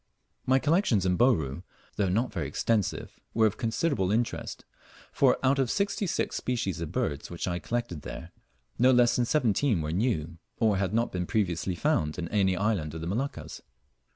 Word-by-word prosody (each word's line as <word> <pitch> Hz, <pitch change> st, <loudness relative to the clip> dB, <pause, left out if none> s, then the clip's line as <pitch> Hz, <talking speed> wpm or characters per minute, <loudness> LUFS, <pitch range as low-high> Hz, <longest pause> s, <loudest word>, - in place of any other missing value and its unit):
My 130 Hz, +1 st, +5 dB
collections 145 Hz, -, +2 dB
in 90 Hz, -1 st, +2 dB
Bouru, 85 Hz, -, +2 dB, 0.3 s
though 100 Hz, -3 st, +1 dB
not 110 Hz, +5 st, 0 dB
extensive, 90 Hz, +7 st, -1 dB, 0.2 s
were 110 Hz, 0 st, +4 dB
of 105 Hz, -, +1 dB
considerable 115 Hz, -, 0 dB
interest; 115 Hz, +2 st, -2 dB, 0.5 s
for 130 Hz, -3 st, +3 dB
out 135 Hz, +1 st, +3 dB
of 130 Hz, -3 st, +1 dB
sixty 200 Hz, -, 0 dB
six -, -, -1 dB
species 115 Hz, -9 st, -2 dB
of 85 Hz, -, -4 dB
birds 70 Hz, 0 st, -2 dB
which 85 Hz, +1 st, -4 dB
I 90 Hz, -1 st, -1 dB
collected 115 Hz, -4 st, -3 dB
there, -, -, -8 dB, 0.5 s
no 125 Hz, +2 st, +6 dB
less 120 Hz, -2 st, +5 dB
than 120 Hz, -, +2 dB
seventeen 120 Hz, -, +2 dB
were 75 Hz, -1 st, -3 dB
new, 85 Hz, -5 st, -1 dB, 0.2 s
or 110 Hz, -4 st, +2 dB
had 95 Hz, -1 st, 0 dB
not 115 Hz, +1 st, +1 dB
been 90 Hz, -1 st, -3 dB
previously 90 Hz, -3 st, -1 dB
found 75 Hz, -2 st, 0 dB
in 85 Hz, -1 st, -3 dB
any 95 Hz, -3 st, +2 dB
island 90 Hz, -7 st, -1 dB
of 80 Hz, -, -5 dB
the -, -, -4 dB
Moluccas. 95 Hz, -, -4 dB
105 Hz, 175 wpm, -28 LUFS, 85-125 Hz, 0.5 s, no